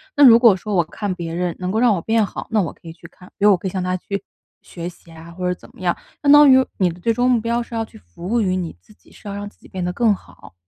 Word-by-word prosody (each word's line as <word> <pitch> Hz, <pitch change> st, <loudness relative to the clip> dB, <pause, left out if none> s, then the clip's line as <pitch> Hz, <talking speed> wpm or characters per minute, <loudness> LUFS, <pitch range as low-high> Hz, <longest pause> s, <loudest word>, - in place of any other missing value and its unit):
那 290 Hz, -, +7 dB
如 230 Hz, -2 st, +9 dB
果 230 Hz, -5 st, +6 dB
说 205 Hz, +3 st, -5 dB
我 175 Hz, -3 st, +3 dB
看 205 Hz, +4 st, -4 dB
别 170 Hz, -2 st, -6 dB
人 175 Hz, -1 st, -2 dB
能 180 Hz, 0 st, -3 dB
够 220 Hz, -, 0 dB
让 240 Hz, -2 st, +4 dB
我 180 Hz, -, -2 dB
变 220 Hz, +3 st, +1 dB
好， -, -, -8 dB
那 225 Hz, -, +1 dB
我 170 Hz, -, -5 dB
可 -, -, -18 dB
以 165 Hz, -, -8 dB
去 170 Hz, +1 st, -14 dB
看， 180 Hz, +2 st, -18 dB
比 205 Hz, -, +1 dB
如 210 Hz, -, +7 dB
我 190 Hz, -, +4 dB
可 185 Hz, -, -5 dB
以 -, -, -4 dB
向 185 Hz, -1 st, -3 dB
他 185 Hz, 0 st, -1 dB
去 200 Hz, +2 st, -5 dB, 0.4 s
学 170 Hz, 0 st, -7 dB
习 170 Hz, -1 st, -18 dB
啊， 165 Hz, +1 st, -12 dB
或 180 Hz, +1 st, -4 dB
者 180 Hz, -, +1 dB
怎 -, -, -15 dB
么 -, -, -15 dB
样。 175 Hz, -2 st, +1 dB, 0.3 s
相 285 Hz, -, +5 dB
当 290 Hz, -1 st, +8 dB
于 260 Hz, 0 st, +6 dB
你 185 Hz, -2 st, +3 dB
的 170 Hz, +1 st, -9 dB
最 230 Hz, +6 st, +1 dB
终 245 Hz, +2 st, +1 dB
目 245 Hz, -2 st, +3 dB
标 235 Hz, +2 st, -1 dB
是 235 Hz, 0 st, -8 dB
要 225 Hz, 0 st, -1 dB
去 -, -, -16 dB
服 85 Hz, -, -11 dB
务 235 Hz, +3 st, +1 dB
于 185 Hz, -3 st, 0 dB
你 180 Hz, -3 st, -4 dB
自 215 Hz, -, -21 dB
己， -, -, -25 dB
是 -, -, -14 dB
要 200 Hz, -, -5 dB
让 205 Hz, 0 st, -5 dB
自 205 Hz, -, -16 dB
己 -, -, -17 dB
变 185 Hz, -2 st, -5 dB
得 180 Hz, -, -2 dB
更 220 Hz, 0 st, +2 dB
好。 140 Hz, -, -17 dB
195 Hz, 355 characters per minute, -20 LUFS, 175-225 Hz, 0.4 s, 如